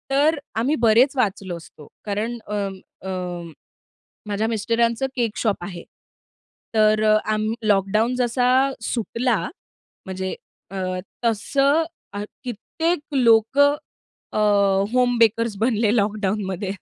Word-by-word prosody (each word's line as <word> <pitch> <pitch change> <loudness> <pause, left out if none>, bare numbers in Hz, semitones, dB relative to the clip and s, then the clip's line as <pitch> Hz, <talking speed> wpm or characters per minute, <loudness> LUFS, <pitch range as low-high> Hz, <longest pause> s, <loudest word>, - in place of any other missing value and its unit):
तर 290 +3 +3 0.2
आम्ही 270 +7 +1
बरेच 240 +3 +4
वाचलो 195 -7 -1
असतो 155 -3 -14 0.2
कारण 215 +3 -2
अं, 205 -2 -2 0.3
अं, 180 -3 -5 0.8
माझ्या 210 +1 -1
मिस्टरांचं 230 +2 +1
केक 235 -4 -1
शॉप 210 -6 -1
आहे. 175 -2 -7 0.9
तर 215 0 +4
अ, 215 0 +5 0.2
आम्ह 215 +1 0
लॉकडाऊन 210 +4 +2
जसा 245 0 +1 0.3
सुटला 230 +1 0 0.7
म्हणजे 190 -1 -4 0.4
अ, - - -7 0.5
तसं 275 +7 +2 0.3
अ, 205 0 -4 0.2
कित्येक 310 - -2 0.2
लोकं 255 +4 +4 0.6
अ, - - -2 0.6
होम 250 -1 +3
बेकर्स 230 -1 +3
बनले 225 -2 +2
लॉकडाऊनमध्ये. 200 -3 -1
220 Hz, 105 wpm, -22 LUFS, 200-245 Hz, 0.9 s, अ